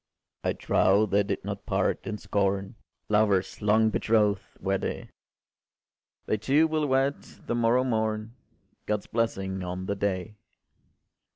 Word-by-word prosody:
I - - +1
trow 100 +3 +3
they 100 0 +2
did 100 - -3
not - - -5
part - - 0
in 105 - -3
scorn: 100 0 -1 0.3
Lovers 105 -3 +2
long 110 +1 +3
betroth’d 105 -3 +2 0.2
were 95 0 0
they: - - -5 1.1
They 110 - 0
two 140 +9 +3
will 155 -1 0
wed 135 +1 +1 0.2
the - - -2
morrow 120 +2 +3
morn! 110 -2 -1 0.5
God’s 105 -1 -1
blessing 95 -5 -2
on 90 +1 -4
the 100 - -1
day! 100 +1 -2
105 Hz, 130 wpm, -27 LUFS, 100-115 Hz, 1.1 s, trow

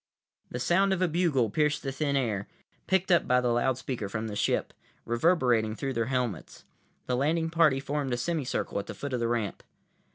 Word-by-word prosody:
The - - -5
sound 190 +8 +3
of 185 - -2
a - - +3
bugle 155 - +1
pierced 150 +2 +1
the 135 - -2
thin 140 +1 -1
air, 110 -7 -1 0.4
picked 190 0 +1
up 175 - +4
by 125 0 +4
the 125 -1 +1
loudspeaker 120 -3 -1
from 110 +2 -3
the 105 - -5
ship, - - 0 0.3
reverberating 120 -5 +2
through 135 +2 -3
their 115 -2 -1
helmets. 125 -9 -3 0.4
The 125 - 0
landing 160 +5 +1
party 160 -5 +4
formed 140 0 -2
a 120 - 0
semi 155 +3 -1
circle 125 - -2
at 100 - -6
the - - -6
foot 140 -2 -5
of 125 - 0
the 115 - 0
ramp. 115 -4 -2
130 Hz, 200 wpm, -28 LUFS, 120-155 Hz, 0.4 s, up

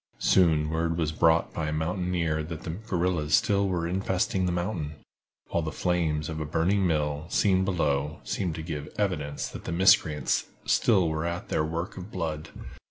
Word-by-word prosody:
Soon 80 -4 +3
word 80 +1 0
was 80 -2 0
brought 80 +1 +3
by 80 -2 -2
a - - -1
mountaineer 85 0 -1
that 80 0 -6
the 80 - -4
guerrillas 90 -5 0
still 100 -3 +2
were 85 -2 -1
infesting 95 0 0
the - - 0
mountain, 85 -4 -2 0.5
while 85 - 0
the 80 -1 -3
flames 80 -3 0
of 80 -1 -4
a - - -1
burning 90 +5 +1
mill, 75 -1 -1
seen 95 -2 +3
below, 75 -5 0
seemed 85 -5 -2
to 80 - -5
give 75 -3 -5
evidence 75 -9 -1
that - - -9
the - - -3
miscreants 85 -4 +3 0.2
still 95 -7 +3
were 80 +1 -1
at 85 +1 -4
their - - +1
work 85 +4 -4
of 95 +2 -7
blood. 80 -5 -4
85 Hz, 175 wpm, -27 LUFS, 75-90 Hz, 0.5 s, Soon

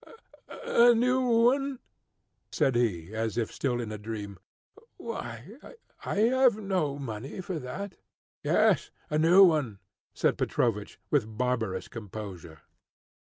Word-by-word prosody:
"A 240 - +5
new 250 +3 +2
one?" 250 +3 +2 0.7
said 135 - +2
he, 100 -6 0
as 110 0 -2
if 115 -2 -1
still 125 -3 -1
in 115 -3 -4
a 105 - -6
dream. 105 -3 -6 0.6
"Why, 125 - -7 0.5
I - - -3
have 240 +2 +4
no 185 -9 -1
money 130 - -6
for 185 -2 -4
that." 175 +10 -7 0.4
"Yes, - - +2 0.2
a 150 - +1
new 175 +5 +7
one," 150 - +2 0.4
said - - +1
Petrovich, 105 -4 -1
with 110 -7 0
barbarous 115 -7 -1
composure. 100 -7 -9
125 Hz, 120 wpm, -28 LUFS, -, 0.7 s, new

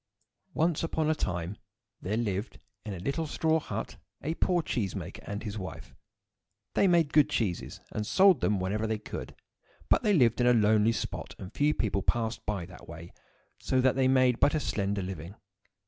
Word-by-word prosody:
ONCE 165 -1 +1
upon 160 -1 0
a - - +4
time 90 - -3 0.4
there 105 +4 -2
lived, 105 -2 -2 0.3
in 105 - -5
a - - -7
little 140 - -2
straw 160 +1 +1
hut, - - -5 0.3
a 155 - -1
poor 175 0 +1
cheese 105 -10 -2
maker 90 -1 -6
and 105 +1 -4
his 105 -1 -4
wife. 95 - -8 0.8
They 200 - +4
made 170 -5 +3
good 150 -1 +5
cheeses, 110 -11 -2
and 105 - -2
sold 190 -3 +5
them 105 -2 +2
whenever 105 +4 -1
they 110 0 -1
could; 105 - -7 0.5
but - - +4
they 210 - +2
lived 125 - +4
in 120 - +4
a 125 - +6
lonely 110 0 +4
spot, 110 - -4
and 95 +3 -9
few 150 +1 +2
people 100 -2 0
passed 115 +1 -1
by 100 -5 -2
that 90 - -13
way, 85 +1 -10 0.5
so 130 - 0
that 130 0 +3
they 130 -1 +3
made 130 -2 +4
but 145 - +4
a - - +2
slender 100 -6 -1
living. 90 0 -6
110 Hz, 190 wpm, -29 LUFS, 100-145 Hz, 0.8 s, a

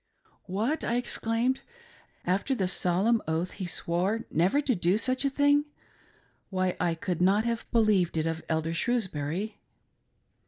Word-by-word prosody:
"What!" 220 - -1
I 235 - 0
exclaimed, 240 +1 0 0.7
"After 195 +9 +1
the 190 -6 0
solemn 190 +6 +2
oath 160 +3 -1
he 185 - -5
swore 180 +6 -1
never 180 - +3
to 275 -3 +1
do 180 0 +2
such 255 +4 +1
a - - +3
thing? 285 +1 +3 0.8
Why, 185 -1 0
I 170 -2 +1
could 175 +1 -3
not 200 +4 +3
have 235 0 -2
believed 210 -7 +3
it 160 - +1
of 165 0 -2
Elder 160 0 0
Shrewsbury!" 190 -2 -2
195 Hz, 145 wpm, -28 LUFS, 175-235 Hz, 0.8 s, never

